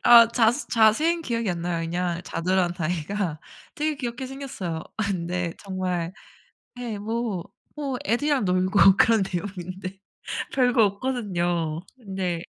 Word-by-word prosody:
아 235 -1 +10
자세 235 +4 +2
자세히는 300 +10 +4
기억이 230 -6 -1
안 170 -1 -3
나요. 170 -1 -1
그냥 175 0 -1
자두라는 180 0 0
아이가 170 +1 -2 0.4
되게 305 0 -1
귀엽게 250 -1 -4
생겼어요. 245 -12 -5
근데 180 -4 -1
정말 185 -3 -2 0.7
예 230 -4 -4
뭐 220 -3 -2 0.3
뭐 275 -4 -2
애들이랑 265 +1 +2
놀고 185 +1 +5
그런 225 -3 +5
내용인데 185 0 -5 0.6
별거 245 -4 +4
없거든요. 180 -8 -1 0.2
근데 190 -6 -3
195 Hz, 275 characters per minute, -25 LUFS, 175-235 Hz, 0.7 s, 아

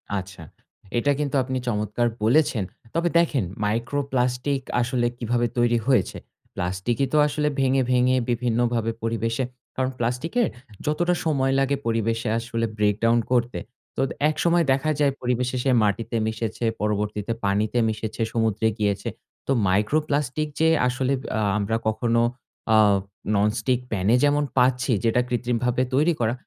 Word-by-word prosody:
আচ্ছা। 95 -3 -6 0.5
এটা 145 +4 +2
কিন্তু 145 -1 -1
আপনি 130 0 -3
চমৎকার 105 +1 0 0.2
বলেছেন। 120 -3 +3 0.3
তবে 170 +1 +1
দেখেন 150 -8 +1 0.2
micro 115 +7 -1
plastic 125 +2 0 0.2
আসলে 120 0 0
কিভাবে 120 0 0
তৈরি 120 0 +3
হয়েছে। 130 -3 +2 0.4
প্লাস্টিকই 95 +9 -1
তো - - +4
আসলে 150 0 -1
ভেঙে, 135 0 +3
ভেঙে 125 +1 +3
বিভিন্নভাবে 120 -1 0
পরিবেশে 115 +2 -1 0.3
কারণ, 130 0 0
প্লাস্টিকের 140 - 0 0.4
যতটা 175 +4 +1
সময় 135 -4 +1
লাগে 135 +1 +2
পরিবেশে 115 0 0
আসলে 115 0 -2
breakdown 105 +3 +2
করতে। 120 -1 +1 0.4
তোদ 135 - +1 0.2
একসময় 170 +2 +2
দেখা 140 +4 +1
যায় 145 -1 +3
পরিবেশে 125 0 -1
সে 135 - +2
মাটিতে 105 +3 -1
মিশেছে, 110 +1 -3 0.2
পরবর্তীতে 105 +1 -1
পানিতে 105 +4 +1
মিশেছে, 110 +1 -4
সমুদ্রে 110 -1 +1
গিয়েছে। 100 -2 0 0.4
তো - - 0 0.2
micro 105 +10 +2
plastic 145 +1 -1
যে 160 - +4 0.2
আসলে 130 +2 0
বা - - -8 0.3
আমরা 105 +2 -1
কখনো 115 +1 +1 0.5
আ - - +6 0.6
ননস্টিক 105 +5 +1
প্যানে 100 +2 +2
যেমন 145 0 +3
পাচ্ছি, 125 +1 +3
যেটা 115 +2 +3
কৃত্রিমভাবে 125 0 0
তৈরি 155 +5 +3
করা। 115 0 +1
120 Hz, 135 wpm, -24 LUFS, 110-135 Hz, 0.6 s, আ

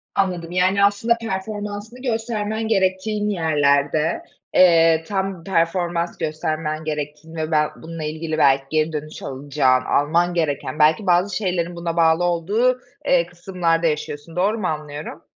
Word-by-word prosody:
Anladım, 180 -3 -1
yani, 185 +2 +2
aslında 205 +4 +3
performansını 210 +3 -5
göstermen 225 -2 -2
gerektiğin 205 +1 0
yerlerde. 150 -3 +1 0.3
Eee, 165 -2 +5
tam 190 -3 -2
performans 170 -1 0
göstermen 155 0 -3
gerektiğini 150 +1 -5
ve 155 0 -3
bel 150 -1 +3
bununla 165 -1 -8
ilgili, 155 +1 -3
belki, 135 -2 +4
geri 155 0 +1
dönüş 155 +1 -6
alacağın, 135 -1 +1
alman 170 +5 +2
gereken, 150 -3 -2
belki 160 +7 +3
bazı 180 +2 +3
şeylerin 180 -4 -1
buna 170 -1 -4
bağlı 165 +1 +4
olduğu, 205 +9 +1 0.3
eee, 175 -1 +3
kısımlarda 175 -1 -1
yaşıyorsun. 150 +1 -4
Doğru 205 +5 +1
mu 185 - -1
anlıyorum? 150 +1 -5
170 Hz, 135 wpm, -21 LUFS, 155-195 Hz, 0.3 s, Eee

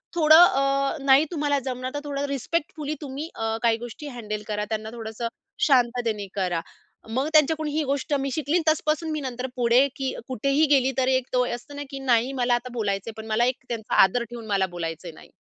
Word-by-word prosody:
"थोडं 315 0 +8
अ, 275 -1 +1
नाही 275 +2 +6
तुम्हाला 290 -3 0
जमणार 255 0 -4
तर 290 - -1
थोडं 285 -1 -2
रिस्पेक्टफुली 305 +2 -3
तुम्ही 290 +2 -6
अ, 225 0 -2
काही 230 -1 +3
गोष्टी 240 +6 -8
हँडल 215 -2 -4
करा, 210 -1 -2
त्यांना 220 0 -3
थोडंसं 225 0 -5 0.4
शांततेने 240 -6 +1
करा." 180 -4 0 0.5
मग 260 +6 -1
त्यांच्याकडून 310 0 +3
ही 310 +1 0
गोष्ट 280 +1 -2
मी 275 - -1
शिकली 310 +4 +1
तसपासून 310 +1 +1
मी 305 - -2
नंतर 255 -1 -4
पुढे 245 +3 +4
की 265 -1 -2
कुठेही 275 +5 +2
गेली 265 -2 +4
तर 260 -1 +2
एक 260 -1 +1
तो 250 0 +3
असतं 285 +4 -11
ना 290 - -5
की 275 - -5
नाही 250 -1 +2
मला 245 -2 +1
आता 240 +1 -4
बोलायचं 205 -3 -2
आहे, - - -7
पण 220 - -11
मला 230 +2 +3
एक 255 0 0
त्यांचा 225 -3 -3
आदर 215 +6 +2
ठेऊन 240 -1 -8
मला 200 -2 +2
बोलायचं 165 -1 -6
नाही. - - -15
255 Hz, 200 wpm, -25 LUFS, 225-285 Hz, 0.5 s, थोडं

